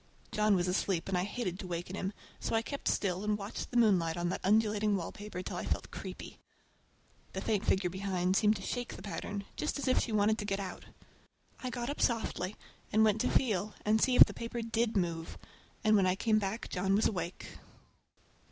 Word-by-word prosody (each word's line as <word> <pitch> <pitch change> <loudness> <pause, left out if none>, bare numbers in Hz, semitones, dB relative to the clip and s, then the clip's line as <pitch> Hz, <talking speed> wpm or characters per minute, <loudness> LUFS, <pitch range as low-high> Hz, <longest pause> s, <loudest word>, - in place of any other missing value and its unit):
John 210 -1 +3
was 180 -1 +1
asleep 180 -1 0
and 195 - 0
I 180 +1 +1
hated 205 -4 -3
to 185 - -6
waken 175 +1 -4
him, 195 -1 -2 0.3
so - - -1
I 225 - +2
kept 280 +3 -5
still 185 -1 0
and 210 0 +1
watched 200 0 -5
the 245 - -1
moonlight 180 -8 +4
on 175 0 0
that - - -3
undulating 210 0 +3
wallpaper 190 +1 -5
till - - -4
I - - -3
felt - - -2
creepy. - - -8 0.9
The - - -3
faint 210 -1 0
figure 185 -2 +2
behind 185 -1 0
seemed 210 +1 +4
to - - -7
shake 245 -1 -3
the - - -10
pattern, 205 0 -4
just 305 - -2
as 285 - -3
if 255 - +4
she 235 - -2
wanted 215 +1 +3
to 205 - -3
get 200 -1 -1
out. 190 -2 -6 0.8
I 255 - -3
got 245 +1 -3
up 290 - -5
softly 215 -4 0 0.4
and 220 +1 +5
went 215 0 +3
to - - +1
feel 210 -4 +1
and 215 +1 +3
see 255 - +3
if - - +11
the - - -8
paper 230 0 -4
did 225 -1 0
move, 165 -3 -2 0.5
and 215 0 +5
when 195 -2 +4
I 185 - +2
came 215 +2 +2
back 205 +3 -3
John 195 +1 +1
was 215 - +3
awake. 175 -3 -3
205 Hz, 210 wpm, -32 LUFS, 185-220 Hz, 0.9 s, if